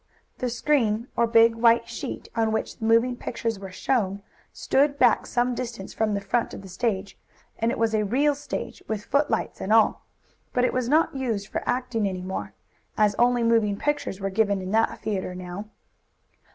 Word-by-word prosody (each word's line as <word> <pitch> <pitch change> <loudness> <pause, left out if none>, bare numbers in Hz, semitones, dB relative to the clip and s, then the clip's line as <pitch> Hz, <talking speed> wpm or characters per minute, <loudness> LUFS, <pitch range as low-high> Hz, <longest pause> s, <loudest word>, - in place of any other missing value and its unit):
The 250 - -1
screen, 235 -3 +1
or 235 - +3
big 230 0 +5
white 230 0 +4
sheet, - - -6
on 225 -1 +1
which 220 - -2
the 220 - -3
moving 230 +2 +3
pictures 230 -3 -3
were 195 -1 -7
shown, 200 -2 -1 0.3
stood 280 +1 +1
back 245 -4 +4
some 245 +1 +1
distance 230 -5 -6
from 215 -2 0
the - - 0
front 230 +4 -1
of - - -9
the 190 - -10
stage. 195 0 -2 0.4
And 230 - +1
it - - -3
was 225 -1 +1
a 215 -1 +2
real 275 +8 +2
stage, 285 +1 -6
with 215 -1 -3
footlights 280 -6 0
and 195 - -3
all, 220 -1 +4 0.5
but 250 0 +3
it - - 0
was 250 -1 -1
not 310 0 +3
used 225 -6 -2
for - - -3
acting 245 -5 0
any 185 -1 -5
more, 190 +1 -5 0.4
as 210 -1 +4
only 245 0 +3
moving 225 -3 +2
pictures 295 -9 -2
were 195 0 -2
given 200 -1 +2
in 185 0 -5
that 225 +1 +1
theatre 190 -3 -2
now. 185 +3 -7
225 Hz, 190 wpm, -25 LUFS, 200-245 Hz, 0.5 s, big